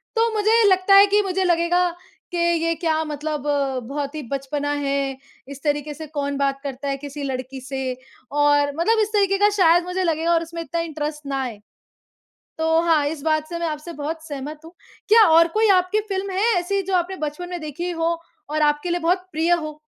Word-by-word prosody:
तो 455 0 +2
मुझे 435 +2 +3
लगता 375 +1 +4
है 400 +1 +9
कि 410 +1 +3
मुझे 380 -1 -1
लगेगा 345 0 +2 0.5
कि 350 - -3 0.3
ये 330 0 +2
क्या 320 -1 0
मतलब 300 -1 -4 0.5
बहुत 285 +1 -4
ही 305 - -4
बचपना 285 +1 -2
है, 275 -2 -1 0.3
इस 280 0 -9
तरीके 295 0 -1
से 315 +1 -8
कौन 285 -2 -3
बात 275 -1 0
करता 280 0 -5
है 275 - -1
किसी 285 +1 -7
लड़की 260 0 -5
से? 265 -1 -3 0.4
और 290 0 +3
मतलब 440 +7 +2
इस 425 - 0
तरीके 395 -1 +3
का 410 +1 +4
शायद 345 0 +5
मुझे 365 +1 -2
लगेगा 330 0 +1
और 335 0 +2
उसमें 335 0 -7
इतना 335 +2 -3
इंटरेस्ट 300 -2 -5
ना 270 -1 -1
आए। 225 -5 -6 1.0
तो 320 0 +3
हाँ, 325 -3 +3
इस 295 -1 -4
बात 310 -1 0
से 340 - -4
मैं 340 - -2
आपसे 305 +3 -6
बहुत 315 +2 -5
सहमत 295 +1 -6
हूँ, 330 - -12 0.4
क्या 445 +1 +7
और 330 +1 +6
कोई 445 -1 +4
आपकी 365 +4 0
फ़िल्म 390 0 -2
है 460 +3 +3
ऐसी 390 +3 -1
जो 380 0 -3
आपने 360 +2 -1
बचपन 350 +5 -6
में 350 -2 -4
देखी 310 +4 -4
हो 335 0 0 0.3
और 305 0 0
आपके 295 +4 +1
लिए 350 0 0
बहुत 365 +2 0
प्रिय 325 +3 +1
हो? 310 -3 -1
320 Hz, 205 wpm, -22 LUFS, 290-355 Hz, 1.0 s, है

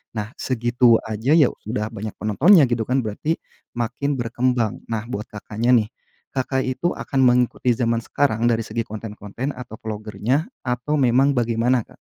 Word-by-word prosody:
Nah, 105 0 -3
segitu 120 -1 +3
aja 110 +6 0
ya, 150 -6 +6 0.2
sudah 110 -1 -2
banyak 105 +1 -6
penontonnya 150 - +5
gitu 115 -2 0
kan, 130 +1 +2
berarti 115 +10 -2 0.4
makin 125 +5 -1
berkembang. 120 -2 -1
Nah 110 -2 -2
buat 105 -2 -4
Kakaknya 110 +3 -3
nih, 110 -3 +2 0.4
Kakak 130 0 0
itu 130 +7 -1
akan 135 - -3
mengikuti 125 0 +3
zaman 115 -1 +1
sekarang 115 -1 0
dari 115 -1 +2
segi 115 +1 -3
konten-konten 110 +4 -5
atau 125 -3 -9
vlogger-nya 110 - -2 0.2
atau 125 +5 -1
memang 130 +3 +4
bagaimana 120 +1 +2
Kak? - - -20
120 Hz, 155 wpm, -22 LUFS, 110-130 Hz, 0.4 s, ya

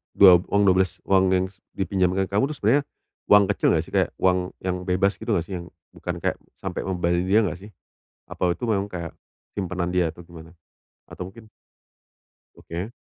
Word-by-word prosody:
duab 90 -3 +7
uang 100 0 +2
12 95 -2 +3
uang 95 -1 +3
yang 90 0 +2
s 95 - -26 0.2
dipinjamkan 95 -1 +1
kamu 105 +7 +2
itu 155 - -5
sebenarnya 130 +8 +4 0.4
uang 105 0 +7
kecil - - 0
enggak - - +1
sih? - - -15
Kayak - - +2
uang 90 -1 +1
yang 90 -1 -1
bebas 95 +2 +1
gitu - - -3
enggak 85 - -1
sih, 95 - -8
yang 85 - -9 0.2
bukan - - -5
kayak - - 0 0.2
sampai - - -5
ngebahayain 90 -1 0
dia 100 +3 +5
nggak 90 -3 -3
sih? 100 +3 -12 0.6
Apa 90 -1 0
itu - - -20
memang 100 -2 +1
kayak 85 -4 -6 0.5
simpanan 90 -2 -2
dia 90 -2 +1
atau 85 - -12
gimana? 85 -1 -13 0.5
Atau 90 +1 -8
mungkin 110 0 -15 1.1
Oke. 90 +7 -6
95 Hz, 185 wpm, -24 LUFS, 90-100 Hz, 1.1 s, duab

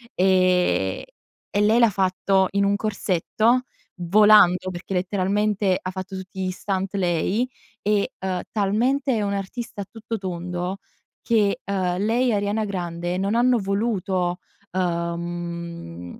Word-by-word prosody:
ehm, 185 - +2 0.5
e 205 - 0
lei 215 +3 +4
l'ha 235 -2 +6
fatto 190 0 +2
in 200 0 +1
un 200 0 +2
corsetto, 215 +4 +1 0.4
volando, 185 -1 +5
perché 180 +2 -6
letteralmente 195 +1 +1
ha 185 - -4
fatto 190 +1 -6
tutti 190 0 -6
gli 185 - -1
stunt 190 +1 -3
lei, 190 +5 +1 0.4
e, 205 0 +1
uhm, 185 -1 -2
talmente 245 +7 +1
è 215 - 0
un'artista 200 +2 -4
a - - -5
tutto 225 0 -5
tondo 180 0 -4 0.4
che, 210 -4 +2
uhm, 185 -3 -1
lei 230 +6 +1
e - - +2
Arianna 205 +2 0
Grande 175 -2 -3
non 200 +3 0
hanno 245 0 +4
voluto, 195 -3 -1 0.3
uhm, 170 - -4
195 Hz, 130 wpm, -23 LUFS, 180-210 Hz, 0.5 s, l'ha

